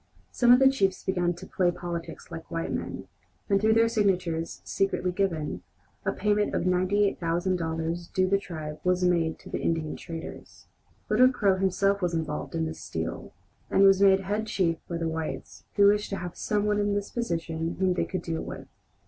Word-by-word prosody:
Some 240 -1 +4
of 245 - +9
the 265 +1 +6
chiefs 195 -9 +1
began 175 -2 0
to 180 +2 -10
"play 185 -2 +1
politics" 175 -1 -6
like 165 - -8
white 165 0 -3
men, - - -5 0.4
and 200 -2 +2
through 220 +1 +4
their 230 0 +5
signatures, 185 -7 0
secretly 195 -2 0
given, 165 - -1 0.4
a - - 0
payment 210 +1 +1
of - - 0
$98,000 175 -3 0
due 185 0 +2
the 195 +1 +2
tribe 155 -5 -7
was 180 0 +2
made 170 -3 +2
to - - -13
the - - -2
Indian 160 -2 -1
traders. 165 -2 -9 0.4
Little 250 +4 +5
Crow 200 -6 +2
himself 195 +1 +1
was 175 -2 0
involved 160 0 -3
in 165 -1 0
this 160 0 -6
steal, 80 0 -5 0.4
and 195 - +4
was 195 0 +6
made 195 -1 +6
head 210 +3 -2
chief 170 -6 +1
by 170 - -2
the 165 -1 -2
whites, 160 -1 -5
who 200 - +5
wished 205 +1 +3
to 195 - -3
have 175 0 -6
some 210 -1 -1
one 210 0 +1
in 205 0 +1
this 205 0 -3
position 165 -7 -2
whom 185 -1 +2
they 180 - 0
could 185 -2 -4
deal 165 -1 -3
with. - - -7
185 Hz, 190 wpm, -27 LUFS, 165-200 Hz, 0.4 s, of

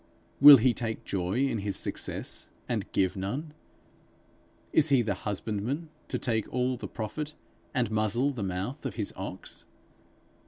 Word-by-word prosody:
Will 145 0 +12
he 120 +1 +3
take 115 -3 -4
joy 95 +2 -1
in 115 -5 -1
his 100 0 -2
success - - -1 0.2
and - - -2
give 95 -2 +1
none? 130 +12 -4 1.2
Is 160 0 +4
he 135 -4 +4
the 105 -2 0
husbandman 105 - -3 0.2
to - - -2
take 110 -3 -1
all 125 +1 0
the 125 - -6
profit, 145 +8 -5 0.4
and 125 -6 0
muzzle 110 +6 +1
the 125 -6 -6
mouth 95 +9 -3
of 135 - -4
his 105 -3 -3
ox? 95 0 -7
115 Hz, 150 wpm, -29 LUFS, 100-135 Hz, 1.2 s, Will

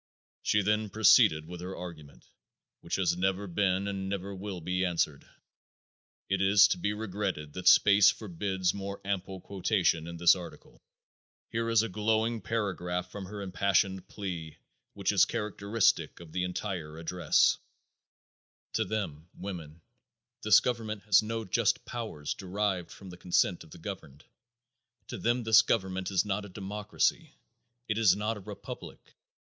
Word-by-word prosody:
She 105 -1 +2
then 105 +1 +1
proceeded 95 -7 +5
with 90 +1 -8
her 90 +2 -6
argument, 80 -5 -10 0.5
which - - -3
has 90 -2 +1
never 95 +2 0
been 95 +1 0
and 95 -1 -3
never 100 0 -4
will 95 -1 -6
be 90 +3 -1
answered. 85 -5 -1 1.0
It 95 -1 0
is 100 +1 +6
to - - -1
be 105 - 0
regretted 95 -8 -4
that 90 0 -4
space 100 0 +7
forbids 95 -2 -1
more 100 0 -5
ample 95 -1 -3
quotation 95 -4 0
in 85 0 -7
this 85 0 +6
article. 90 -2 -10 0.7
Here 115 0 -2
is 115 -1 +4
a - - -1
glowing 110 +3 0
paragraph 90 -4 -2
from 100 -2 -7
her 100 +1 -7
impassioned 95 +1 +1
plea 85 -6 -6 0.4
which - - 0
is - - +5
characteristic 105 +1 0
of 85 -2 -12
the 90 +1 -1
entire 90 -4 -4
address: 85 0 +2 1.1
"To 110 - +1
them 90 -6 -4
(women) 85 -5 -8 0.6
this - - +6
government 110 -4 -3
has 105 -2 +5
no 115 +1 -4
just 95 - +1
powers 110 -12 -4
derived 95 -1 -2
from 95 -2 -11
the 90 - -11
consent 90 0 +1
of 80 - -17
the - - -12
governed. 80 -6 -8 0.8
To - - -5
them 120 +1 +1
this 110 0 +7
government 95 -4 -1
is 95 +1 +1
not 105 0 -2
a 100 - -9
democracy. 105 +2 -2 0.5
It 110 0 -1
is 100 -5 +5
not 105 +2 -2
a - - -8
republic. 95 - -10
95 Hz, 150 wpm, -30 LUFS, 90-105 Hz, 1.1 s, space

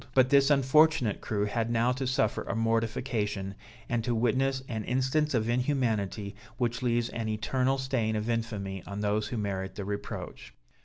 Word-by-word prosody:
But 130 -1 +5
this 140 0 +6
unfortunate 145 -3 +4
crew 105 -1 -1
had 115 +2 -1
now 120 +1 +2
to 130 +1 -2
suffer 125 -4 +1
a - - -4
mortification, 115 -3 -1 0.3
and 120 -2 0
to 120 0 0
witness 130 +3 +1
an 110 -2 -3
instance 130 +3 +1
of 110 -1 +1
inhumanity, 115 -6 0 0.2
which 120 -1 -1
leaves 120 -1 +1
an 115 -2 -3
eternal 130 +5 0
stain 130 -5 0
of 105 +1 -2
infamy 105 -5 -2
on 100 +1 -5
those 105 0 0
who 120 - -4
merit 95 -2 -3
the 100 - -5
reproach. 100 0 -6
115 Hz, 165 wpm, -29 LUFS, 105-130 Hz, 0.3 s, this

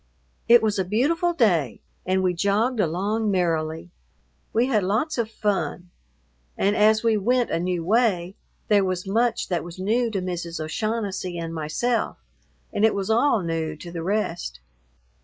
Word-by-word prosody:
It 235 -1 +7
was 210 -2 +1
a - - +2
beautiful 295 - +1
day 180 - +1 0.3
and 185 0 +1
we 180 -1 +2
jogged 210 +7 +1
along 205 +5 0
merrily. 165 -2 -1 0.6
We 230 +2 +2
had 235 -5 +2
lots 230 - 0
of 225 -2 0
fun, 180 -5 -2 0.7
and 205 +1 +2
as 215 +1 +4
we 225 -2 +3
went 245 +4 +1
a - - 0
new 175 -1 -1
way, 195 -4 +2 0.3
there 205 -2 +4
was 185 -1 -2
much 230 +5 +1
that 175 -4 -1
was 175 +1 -9
new 225 +6 +1
to 205 -3 -2
Mrs. 175 -2 -4
O'Shaughnessy 190 +1 -3
and 165 -1 -4
myself, 165 +10 -1 0.6
and 205 - 0
it 220 - +4
was 200 +1 -1
all 230 -2 +3
new 165 -2 -2
to 170 +3 -10
the 170 -1 -5
rest. 175 - -2
195 Hz, 160 wpm, -24 LUFS, 175-225 Hz, 0.7 s, It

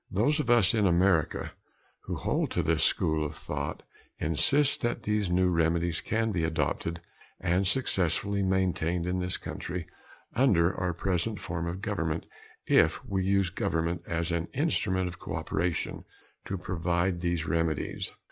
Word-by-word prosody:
Those 145 - +2
of 140 -6 -1
us 120 -6 +5
in 105 -3 +3
America 85 -3 +2 0.5
who - - -3
hold - - 0
to - - +1
this - - +2
school 80 -1 +2
of 75 - -4
thought, - - -5 0.3
insist 135 - +3
that 120 -2 -1
these 105 -3 0
new 90 +1 +3
remedies 85 0 +1
can 115 0 0
be 85 -5 -1
adopted 85 +1 -1 0.4
and 90 +2 +1
successfully 100 -3 +1
maintained 90 -3 0
in 90 +1 -1
this 90 0 +1
country 90 -1 -5 0.5
under 95 -8 +3
our 90 -2 -1
present 95 +4 -1
form 85 -1 -4
of 90 +4 -5
government 85 -8 -2 0.4
if - - +3
we 95 -1 -1
use 95 -1 +2
government 85 -3 -1
as 85 0 -1
an 85 0 -1
instrument 100 - +1
of 90 -1 -7
cooperation 85 -1 -2 0.4
to 95 - -3
provide 85 0 -1
these 85 -2 -1
remedies. 80 -4 -1
90 Hz, 145 wpm, -29 LUFS, 85-100 Hz, 0.5 s, us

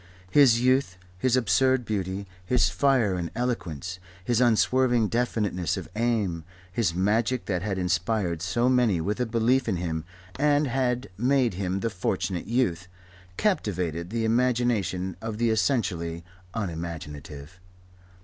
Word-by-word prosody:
His 125 -4 +6
youth, 130 -6 +2 0.2
his 125 +4 +2
absurd 130 +3 +2
beauty, 100 -2 -3 0.2
his 125 +7 +2
fire 130 -8 +2
and 85 -2 -3
eloquence, 95 - -3 0.3
his 120 0 +2
unswerving 120 -1 +3
definiteness 105 -7 -1
of 90 -4 -6
aim, 105 -8 0 0.3
his 95 -4 0
magic 110 +6 +1
that 90 -3 -1
had 100 -1 -2
inspired 90 -1 0
so 120 +7 +1
many 125 -8 +3
with 100 +7 -2
a 125 - 0
belief 115 +3 +2
in 95 - +1
him 80 -2 -3 0.4
and 145 +1 +3
had 125 -3 -1
made 130 -2 +2
him 95 +1 -2
the 115 - -1
Fortunate 95 -2 -2
Youth, 95 -7 0 0.5
captivated 90 - -1
the 115 +1 -1
imagination 110 -7 +1
of 110 -1 -4
the 115 0 +2
essentially 90 -9 0 0.3
unimaginative. 80 -4 -6
105 Hz, 130 wpm, -26 LUFS, 90-125 Hz, 0.5 s, His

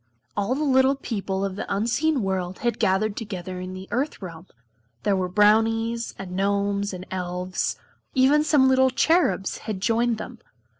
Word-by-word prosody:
All 205 +5 0
the 300 - -1
little 265 -1 +4
people 200 -7 -3
of 195 -1 -4
the - - -5
Unseen 240 +6 +1
world 185 -1 -2
had 240 -2 -1
gathered 205 0 +1
together 185 -4 -6
in 185 0 -6
the 190 +1 -8
Earth 275 +5 -1
realm. 175 -2 -9 0.6
There 205 - +2
were 185 -1 -1
Brownies, 225 +3 +2
and 190 -2 -7
Gnomes, 200 +1 0
and 185 -1 -7
Elves; 180 0 -2 0.4
even 275 +3 +4
some 295 -4 +4
little 260 0 +4
Cherubs 255 - +1
had 215 -3 -5
joined 230 +3 +1
them. 235 +2 -8
205 Hz, 160 wpm, -24 LUFS, 190-245 Hz, 0.6 s, little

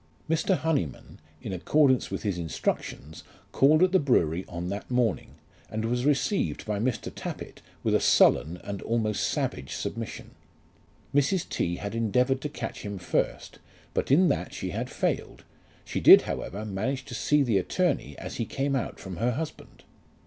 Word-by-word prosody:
Mr. 165 +4 +2
Honyman, 145 - -2 0.2
in 100 - -4
accordance 130 - +3
with - - -4
his 100 -5 -1
instructions, 80 -2 -3 0.3
called 155 +5 +5
at 185 - +4
the 190 - +5
brewery 90 - +2
on 85 +1 -4
that 100 +2 -5
morning, 120 -8 0 0.3
and 110 +1 -3
was 125 +2 0
received 150 +8 0
by 105 -1 -2
Mr. 120 +2 -2
Tappitt - - -7 0.2
with - - +1
a - - +4
sullen 80 +4 +4
and 100 -2 -5
almost 110 -2 0
savage 65 - -2
submission. - - -5 0.8
Mrs. 145 +6 +2
T. 85 0 -1
had 100 +3 -5
endeavoured 125 +4 +1
to 150 - -3
catch 115 -5 -6
him 100 -1 -5
first, 90 - -2 0.3
but - - -1
in 170 +7 +5
that - - -1
she - - -4
had - - -3
failed; - - -2 0.4
she - - -3
did, - - +9
however, 105 +3 -4
manage 125 +7 -2
to - - -9
see 145 +5 +2
the 115 -7 +2
attorney 90 - -1
as - - -7
he 115 - -1
came 140 +3 -1
out 130 - -3
from 95 -3 -7
her 120 +2 +1
husband. 155 +5 -7
115 Hz, 165 wpm, -27 LUFS, 100-140 Hz, 0.8 s, did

